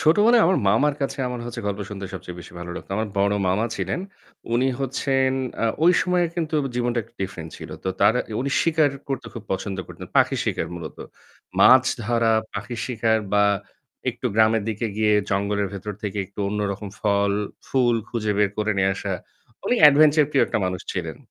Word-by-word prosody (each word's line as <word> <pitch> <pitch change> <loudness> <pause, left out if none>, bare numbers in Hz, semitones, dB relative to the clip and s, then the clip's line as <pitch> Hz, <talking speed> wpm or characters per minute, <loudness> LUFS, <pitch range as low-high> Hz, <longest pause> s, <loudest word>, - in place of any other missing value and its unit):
ছোটবেলায় 210 +9 +5
আমার 185 - +3
মামার 140 +8 +3
কাছে 140 0 -2
আমার 125 -1 -5
হচ্ছে 120 - -5
গল্প 100 0 -2
শুনতে 100 -1 -6
সবচেয়ে 90 -1 -8
বেশি - - -12
ভালো 85 0 -7
লাগতো। - - -9
আমার 110 0 -1
বড় 100 +1 +3
মামা 105 +5 +1
ছিলেন, 95 - -2 0.5
উনি 130 +3 +3
হচ্ছেন 135 0 +1 0.3
আ - - +3 0.2
ঐ - - +5 0.2
সময়ে 180 -1 +2
কিন্তু 160 -2 -2 0.2
জীবনটা 120 0 0
একটু 115 +2 -22
ডিফারেন্ট 85 -4 -6
ছিল। - - -9
তো - - 0
তার 105 +3 +5 0.3
উনি 140 +2 -1
শিকার 155 -3 +3 0.2
করতে 135 -2 -3
খুব 115 - -6
পছন্দ 95 +1 -3
করতেন। - - -10
পাখির - - +3
শিকার 80 - -1
মূলত। 80 -3 -7 0.6
মাছ 130 0 +8 0.2
ধরা, 115 0 +2 0.2
পাখির 110 +3 -5
শিকার 115 -2 +1
বা 105 0 +5 0.7
একটু - - -5
গ্রামের 110 0 +4
দিকে 110 +1 -2
গিয়ে 105 -1 +3 0.2
জঙ্গলের 100 +1 0
ভেতর 100 +2 -5
থেকে 105 -1 -3
একটু 100 - -25
অন্য 105 +1 -2
রকম 100 +1 -7
ফল, 100 -1 +2 0.4
ফুল 125 -3 +3
খুঁজে 110 -3 -1
বের 105 -2 +3
করে 105 0 +1
নিয়ে 95 0 +3
আসা। 100 0 -4 0.5
উনি 245 - +2
অ্যাডভেঞ্চার 150 +1 +7
প্রিয় 140 - +3
একটা - - -1
মানুষ 90 -1 -2
ছিলেন। - - -4
110 Hz, 185 wpm, -23 LUFS, 100-135 Hz, 0.7 s, মাছ